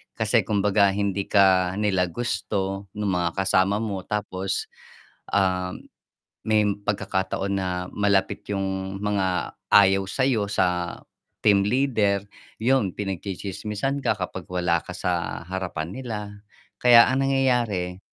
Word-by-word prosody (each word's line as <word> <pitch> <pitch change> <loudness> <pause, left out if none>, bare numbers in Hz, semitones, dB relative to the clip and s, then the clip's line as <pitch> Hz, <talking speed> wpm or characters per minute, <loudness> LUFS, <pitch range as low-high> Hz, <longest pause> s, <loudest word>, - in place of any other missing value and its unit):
kasi - - +1
kumbaga 100 -1 +3
hindi 100 -1 -1
ka 95 -2 +4
nila 95 -3 +1
gusto 95 -1 -3
nung 105 -2 -1
mga 85 -1 -1
kasama 100 +4 +2
mo 100 -3 -3
tapos, 95 -2 -3 0.6
um, 90 -2 +1 0.7
may 110 -1 +4 0.2
pagkakataon 95 -1 -1
na 95 -1 -2 0.2
malapit 100 -1 +1
yung 95 0 -3
mga 95 -3 -1 0.2
ayaw 95 -1 +6
sa'yo 125 -4 +1
sa 90 -3 0 0.4
team 100 -2 +5
leader, 105 -6 +1 0.4
yun 120 -5 +2
pinagtsitsismisan 100 +6 -3
ka - - +2
kapag - - -5
wala 90 -2 +1
ka - - -9
sa 85 -1 -2
harapan 90 -3 -4
nila. 120 -5 -4 0.6
Kaya 120 -1 +7
ang 135 +1 +1
nangyayari, 120 -10 0
100 Hz, 115 wpm, -24 LUFS, 95-105 Hz, 0.7 s, Kaya